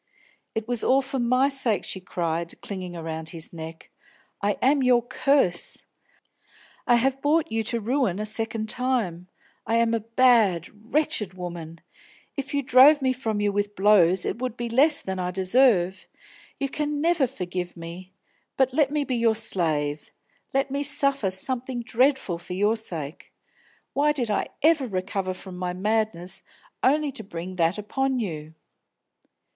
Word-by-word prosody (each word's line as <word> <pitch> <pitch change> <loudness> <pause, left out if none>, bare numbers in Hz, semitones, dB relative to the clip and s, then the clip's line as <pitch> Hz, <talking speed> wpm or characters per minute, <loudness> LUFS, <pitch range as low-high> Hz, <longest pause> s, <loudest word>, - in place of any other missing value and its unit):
"It 220 0 -3
was 245 -2 0
all 270 +1 +3
for 265 0 -4
my 255 +3 +3
sake!" 260 -8 0
she 190 - -4
cried, 170 -2 -3
clinging 185 -3 -6
around 160 -1 -4
his 165 0 -7
neck. 160 0 -9 0.5
"I 205 0 0
am 275 +2 +3
your 250 -2 +4
curse. 260 -7 +1 1.0
I 240 - +6
have 265 +3 +1
brought 305 -2 +2
you 225 0 0
to 235 +1 -2
ruin 235 -4 0
a 210 - -3
second 220 0 -2
time. 220 -8 -1 0.4
I 225 - +1
am 230 0 +3
a 230 - +1
bad, 225 -6 +3 0.2
wretched 220 - 0
woman; 170 -2 -7 0.5
if 275 -1 -4
you 285 -1 0
drove 270 +3 +6
me 260 -1 +2
from 225 -5 -2
you 205 0 +2
with 205 +1 -2
blows 190 -3 +4
it - - -3
would 250 -2 -3
be 240 0 -3
less 285 +6 +4
than 190 -1 -4
I 180 0 -1
deserve! 190 -1 +2 0.5
You 275 - 0
can 295 +1 -2
never 325 -3 +2
forgive 180 -7 -5
me; 170 +3 -9 0.5
but 265 -1 +2
let 290 -1 +3
me 295 0 0
be 265 -3 -2
your 230 -1 +3
slave, 155 -9 -1 0.4
let 270 0 0
me 280 +1 -1
suffer 275 -6 +2
something 245 +5 -2
dreadful 255 -7 +1
for 175 - -8
your 205 +4 +2
sake! 165 -9 -6 0.6
Why 295 +2 +3
did 245 -7 -2
I - - 0 0.2
ever 310 -4 +4
recover 185 -1 -3
from 185 -1 -10
my 180 0 -3
madness, 195 -2 -1 0.4
only 295 +2 +2
to 220 - -6
bring 185 -1 -7
that 170 +2 +2
upon 265 +6 -1
you!" 160 -7 -5
220 Hz, 160 wpm, -25 LUFS, 180-265 Hz, 1.0 s, I